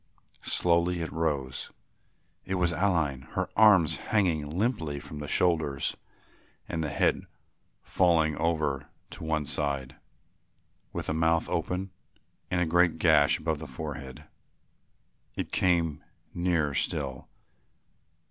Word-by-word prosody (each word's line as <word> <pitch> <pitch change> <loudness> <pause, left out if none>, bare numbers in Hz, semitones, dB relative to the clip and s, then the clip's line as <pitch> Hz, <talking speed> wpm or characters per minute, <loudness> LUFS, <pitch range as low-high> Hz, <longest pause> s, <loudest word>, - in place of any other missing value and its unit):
Slowly 85 0 +2
it 80 - -4
rose; 75 -5 -2 0.7
it 95 - -3
was 90 -2 +1
Aline, 85 -7 +1
her - - -1
arms 100 -7 +6
hanging 85 -9 0
limply 80 - -1
from 75 - -8
the 75 - -5
shoulders 80 -4 +1 0.7
and 80 - -2
the 75 - -2
head 70 - +1 0.6
falling 80 -4 +2
over 75 -3 0 0.2
to - - -8
one 80 -2 -1
side, 70 -3 -2 0.9
with - - -4
the - - -1
mouth 80 +1 +2
open 95 +1 -2 0.6
and 90 - 0
a 90 - +2
great 85 0 +3
gash 80 -3 +4
above 80 -1 -2
the 80 - -7
forehead. 70 -1 -7 1.1
It - - -4
came 85 -4 +1 0.3
nearer 85 -5 0
still. 65 -2 -1
80 Hz, 120 wpm, -28 LUFS, 75-85 Hz, 1.1 s, arms